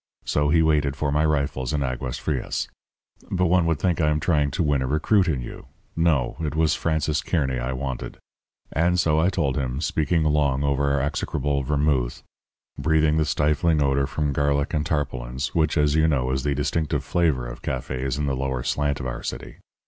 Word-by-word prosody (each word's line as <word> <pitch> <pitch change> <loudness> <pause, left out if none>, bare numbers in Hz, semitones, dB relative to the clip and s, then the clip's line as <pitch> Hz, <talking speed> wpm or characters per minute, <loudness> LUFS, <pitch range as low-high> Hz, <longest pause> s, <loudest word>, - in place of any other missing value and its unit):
So 75 0 +1
he 80 +1 +4
waited 75 -3 +2
for 70 +1 -1
my 75 +1 +2
rifles 70 -4 0
in 75 -2 0
Aguas 65 -1 -3
Frias. - - -2 0.6
But 90 -1 +1
one 90 -1 +3
would 80 -2 +1
think 85 +1 0
I 75 - +3
am 75 0 +1
trying 75 -3 +1
to 85 +6 -1
win 70 -3 +1
a 65 - -1
recruit 90 +7 +2
in 70 -7 0
you! - - -9 0.3
No; 80 -7 +1
it 75 -2 -3
was 80 -1 +3
Francis 80 -1 0
Kearny 65 -7 -1
I - - -2
wanted. 65 -1 -5 0.5
And 90 +2 +2
so 80 -2 +3
I 85 +4 +3
told 75 -8 -1
him, 65 -1 -2
speaking 80 +1 +1
long 75 -3 +1
over 70 0 +1
our 70 -1 +1
execrable 70 0 -1
vermouth, 70 -3 0 0.6
breathing 80 +1 +2
the 80 - +2
stifling 75 +2 +1
odour 70 -1 +2
from 75 0 -1
garlic 70 +2 0
and 75 -2 +1
tarpaulins, 65 -4 -3
which, 80 -1 +1
as 75 -1 +3
you 80 +1 +3
know, 65 -5 +1
is 65 +1 0
the 70 +1 -1
distinctive 75 0 -1
flavour 80 -6 +1
of - - -8
cafés 65 0 -3
in 75 - -1
the 70 -1 0
lower 65 -1 -2
slant 70 +1 0
of 65 - -5
our 60 -1 -4
city. - - -6
75 Hz, 195 wpm, -24 LUFS, 65-80 Hz, 0.6 s, he